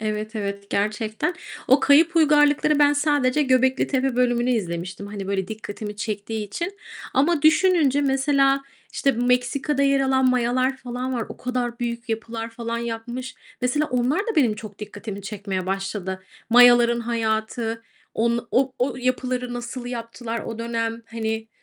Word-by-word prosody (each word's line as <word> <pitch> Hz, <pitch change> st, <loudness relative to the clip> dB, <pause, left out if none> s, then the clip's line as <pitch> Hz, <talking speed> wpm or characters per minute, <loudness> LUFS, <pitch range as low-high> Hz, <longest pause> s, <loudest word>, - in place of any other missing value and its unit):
evet, 215 Hz, +1 st, -3 dB
evet, 200 Hz, -1 st, -4 dB
gerçekten. 215 Hz, -, -1 dB, 0.3 s
O 265 Hz, +3 st, +6 dB
Kayıp 320 Hz, +4 st, +5 dB
Uygarlıklar'ı 295 Hz, -1 st, +4 dB
ben 290 Hz, 0 st, +5 dB
sadece 290 Hz, -1 st, +2 dB
Göbeklitepe 260 Hz, 0 st, +2 dB
bölümünü 245 Hz, 0 st, +2 dB
izlemiştim, 180 Hz, -3 st, -3 dB
hani, 200 Hz, -2 st, -6 dB
böyle 190 Hz, -1 st, -2 dB
dikkatimi 210 Hz, -1 st, -6 dB
çektiği 210 Hz, +1 st, -3 dB
için. 345 Hz, -, -5 dB, 0.4 s
Ama 295 Hz, +3 st, +2 dB
düşününce 315 Hz, -4 st, +4 dB
mesela, 275 Hz, 0 st, +2 dB, 0.3 s
işte, 275 Hz, -, +1 dB
Meksika'da 250 Hz, +4 st, +1 dB
yer 275 Hz, 0 st, +3 dB
alan 265 Hz, -1 st, +3 dB
Mayalar 255 Hz, +2 st, +1 dB
falan 255 Hz, +1 st, -4 dB
var. 235 Hz, -2 st, -1 dB
O -, -, -9 dB
kadar 245 Hz, -1 st, -3 dB
büyük 235 Hz, -1 st, -4 dB
yapılar 225 Hz, 0 st, -4 dB
falan 230 Hz, 0 st, -4 dB
yapmış. 235 Hz, +2 st, -5 dB, 0.3 s
Mesela 265 Hz, +5 st, +1 dB
onlar 250 Hz, +5 st, 0 dB
da 440 Hz, -2 st, -3 dB
benim 245 Hz, -8 st, +4 dB
çok 210 Hz, -1 st, -10 dB
dikkatimi 205 Hz, -1 st, -7 dB
çekmeye 195 Hz, -2 st, -4 dB
başladı. 195 Hz, -1 st, -3 dB, 0.3 s
Mayaların 240 Hz, 0 st, +6 dB
hayatı, 225 Hz, 0 st, -2 dB, 0.3 s
on 235 Hz, +1 st, 0 dB
o 260 Hz, 0 st, +2 dB
o 250 Hz, +1 st, 0 dB
yapıları 255 Hz, 0 st, -1 dB
nasıl 240 Hz, +1 st, -6 dB
yaptılar 230 Hz, -1 st, -5 dB
o 225 Hz, -1 st, -6 dB
dönem? 230 Hz, 0 st, -2 dB
Hani, 225 Hz, -1 st, -3 dB
240 Hz, 140 wpm, -23 LUFS, 220-265 Hz, 0.4 s, O